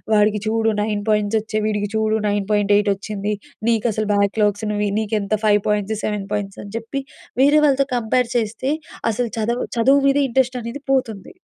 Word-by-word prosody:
"వాడికి 210 0 +3
చూడు 225 0 +1
9 210 -1 -1
పాయింట్స్ 210 +1 +2
వచ్చయి, 215 0 -3
వీడికి 205 -1 -1
చూడు 220 0 +1
9.8 205 0 +2
వచ్చింది. 205 +1 -4 0.4
నీకు 230 -1 +1
అసలు 215 0 -2
బ్యాక్లాగ్స్‌ను 205 +1 +1 0.2
నీకు 220 -1 -2
ఎంత 200 +1 -3
5 210 -1 +4
పాయింట్స్, 210 0 0
7 210 -2 -2
పాయింట్స్" 200 -2 -3
అని 200 - -10
చెప్పి 230 +4 -4 0.4
వేరే 290 +3 +6
వాళ్ళతో 275 -1 +3
కంపేర్ 240 +1 +1
చేస్తే, 230 +4 -1 0.4
అసలు 240 +2 -2
చదవ 235 +3 -1
చదువు 270 +5 +5
మీదే 280 +1 +3
ఇంట్రెస్ట్ 255 +1 +1
అనేది 235 +5 -6
పోతుంది. 225 -7 -1
215 Hz, 160 wpm, -20 LUFS, 205-235 Hz, 0.4 s, వేరే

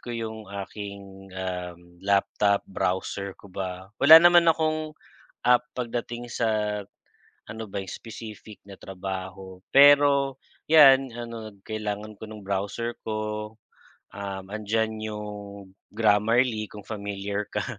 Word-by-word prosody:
ko - - -12
yung 110 -3 -5
aking, 100 -1 -8
um, 90 -1 -6
laptop, 100 +1 +2
browser 95 +1 -3
ko 100 -2 -16
ba, 95 +1 -6
wala 155 +3 +11
naman 175 0 +7
akong, 155 -1 0 0.5
ah, 125 - +8 0.2
pagdating 120 0 -4
sa 105 -3 -1 0.6
ano 110 +1 -6
ba 100 -1 -5
specific 110 -2 -9
na 100 - -10
trabaho 95 0 -7
pero, 140 -1 +6 0.3
'yan, 135 -5 +7
ano 115 -2 -6 0.2
kailangan 105 -1 -4
ko 110 - -8
nung 105 -2 -10
browser 100 +5 -2
ko, 110 0 -4 0.6
um, 100 -1 -6
andiyan 110 +1 -1
yung 105 -1 -5 0.7
Grammarly 110 +1 +2
kung 105 -2 -11
familiar 100 -1 -4
ka. - - -2
105 Hz, 115 wpm, -26 LUFS, 100-115 Hz, 0.7 s, wala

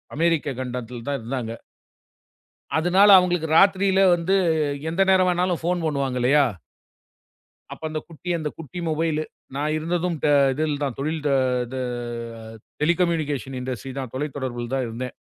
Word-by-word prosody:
அமேரிக்க 165 -2 +1
கண்டத்தில் 125 -2 -6
தான் 140 - -1
இருந்தாங்க. 115 -1 -4 1.2
அதனால 185 +5 +5
அவங்களுக்கு 175 -3 0
ராத்திரியில 195 0 +4
வந்து 175 +3 0 0.6
எந்த 175 +4 0
நேரம் 185 -1 +4
வேணாலும் 180 -1 0
ஃபோன் 175 +1 0
பண்ணுவாங்க 140 -4 -1
இல்லையா? 140 +4 +4 1.3
அப்ப - - -14
அந்தக் 155 -1 -5
குட்டி 170 +2 -9
அந்தக் 150 -2 -5
குட்டி 165 +2 -7
மொபைலு. 155 0 0 0.3
நான் 150 +2 -1
இருந்ததும் 170 +1 -1 0.4
இதுல 150 0 -1
தான் 135 -4 -2
தொழில் 155 +3 -2 0.5
இது 130 +2 -6 1.0
டெலிகம்யூனிகேஷன் 150 -6 0
இண்டஸ்ட்ரி 130 0 -5
தான். 130 -3 -5
தொலைதொடரபுல 130 -4 -4
தான் 130 -2 0
இருந்தேன். 125 +3 -5
155 Hz, 125 wpm, -23 LUFS, 130-175 Hz, 1.3 s, அதனால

